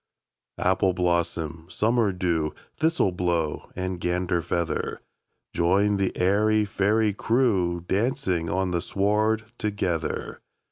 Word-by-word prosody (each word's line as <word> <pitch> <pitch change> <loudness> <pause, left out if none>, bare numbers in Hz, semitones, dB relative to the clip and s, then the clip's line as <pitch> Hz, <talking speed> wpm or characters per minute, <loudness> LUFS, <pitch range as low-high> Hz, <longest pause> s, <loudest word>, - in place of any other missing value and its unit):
Appleblossom, 85 -3 0
Summerdew, 95 -9 +1 0.2
Thistleblow, 90 - 0
and 90 -1 -3
Ganderfeather! 85 -2 -1 0.6
Join 100 +4 +2
the 95 -1 -1
airy 105 +3 +3
fairy 105 +2 +1
crewDancing 95 -3 0
on 95 0 0
the 85 -1 0
sward 105 +4 +1 0.2
together! 95 -6 -2
95 Hz, 80 wpm, -25 LUFS, 85-105 Hz, 0.6 s, airy